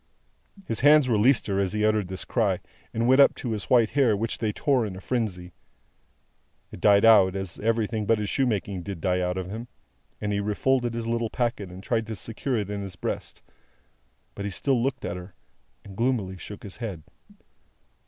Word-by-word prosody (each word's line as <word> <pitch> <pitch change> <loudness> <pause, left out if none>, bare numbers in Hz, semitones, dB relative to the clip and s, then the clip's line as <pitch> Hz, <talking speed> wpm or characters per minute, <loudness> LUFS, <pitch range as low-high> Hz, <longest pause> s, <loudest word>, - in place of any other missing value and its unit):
His 115 - -2
hands 145 0 +6
released 120 +2 +3
her 100 -1 -1
as 95 -1 0
he 105 0 +1
uttered 110 -3 +2
this 95 0 -6
cry, 100 -7 +1 0.3
and 115 +1 0
went 130 +2 +6
up - - +5
to 120 - -4
his 105 -2 -3
white 120 -4 +3
hair, 125 -7 +3
which 115 +2 -2
they 110 -2 0
tore 135 +2 +1
in 100 -4 -4
a - - -8
frenzy. 95 -7 -3 1.2
It - - -10
died 100 0 +5
out, 100 -4 +6
as 95 -3 -4
everything 110 -1 0
but 115 - +4
his 105 -1 -2
shoemaking 100 -7 -1
did 95 -1 -6
die 90 +2 0
out 90 0 -1
of 95 0 -4
him, 115 +3 -6 0.5
and 105 0 -2
he 100 - 0
refolded 120 +4 0
his 115 -1 -3
little 115 0 -1
packet 115 -6 -2
and 90 +2 -10
tried 115 0 -1
to 110 - -4
secure 115 +5 -3
it 105 -2 -3
in 100 -1 -3
his 95 -3 -7
breast; - - -5 0.9
but 100 - -6
he 100 - -2
still 125 +6 0
looked 130 0 -2
at 90 - -3
her, 90 +1 -11 0.5
and 100 -1 -11
gloomily 115 -5 0
shook 105 - -9
his 100 - -9
head. 100 -9 -6
105 Hz, 200 wpm, -26 LUFS, 95-120 Hz, 1.2 s, hands